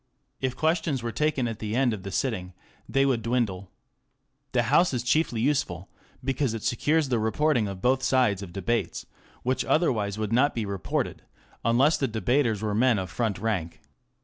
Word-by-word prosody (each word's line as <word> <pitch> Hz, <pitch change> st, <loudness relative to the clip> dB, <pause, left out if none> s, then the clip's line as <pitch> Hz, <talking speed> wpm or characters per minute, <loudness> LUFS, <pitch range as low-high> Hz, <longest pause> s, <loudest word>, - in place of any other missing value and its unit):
If 130 Hz, -1 st, -2 dB
questions 160 Hz, -5 st, 0 dB
were 115 Hz, -, -2 dB
taken 145 Hz, -2 st, 0 dB
at 115 Hz, -2 st, -5 dB
the 105 Hz, 0 st, -3 dB
end 125 Hz, -2 st, +2 dB
of 105 Hz, -, -5 dB
the 100 Hz, -, -6 dB
sitting 95 Hz, -4 st, -2 dB, 0.4 s
they 135 Hz, 0 st, +3 dB
would 130 Hz, -4 st, +1 dB
dwindle. 110 Hz, -6 st, -1 dB, 0.8 s
The 120 Hz, -, +2 dB
House 140 Hz, +6 st, +3 dB
is 120 Hz, -, -2 dB
chiefly 125 Hz, -3 st, +1 dB
useful 100 Hz, -, 0 dB, 0.3 s
because 135 Hz, -2 st, 0 dB
it 110 Hz, -, -6 dB
secures 150 Hz, +4 st, +1 dB
the 120 Hz, -3 st, +1 dB
reporting 115 Hz, +2 st, +1 dB
of 95 Hz, -1 st, -7 dB
both 130 Hz, +1 st, +3 dB
sides 125 Hz, -7 st, +2 dB
of 95 Hz, -3 st, -8 dB
debates, 115 Hz, +6 st, -2 dB, 0.4 s
which 130 Hz, +1 st, 0 dB
otherwise 110 Hz, -, +1 dB
would 110 Hz, 0 st, -2 dB
not 135 Hz, +5 st, +3 dB
be 115 Hz, -2 st, -1 dB
reported, 100 Hz, -2 st, -2 dB, 0.4 s
unless 125 Hz, +7 st, +4 dB
the 135 Hz, -, 0 dB
debaters 110 Hz, 0 st, +1 dB
were 105 Hz, -1 st, -1 dB
men 120 Hz, +1 st, +3 dB
of 95 Hz, -1 st, -4 dB
front 110 Hz, -5 st, -1 dB
rank. 95 Hz, -5 st, -2 dB
120 Hz, 175 wpm, -26 LUFS, 105-135 Hz, 0.8 s, unless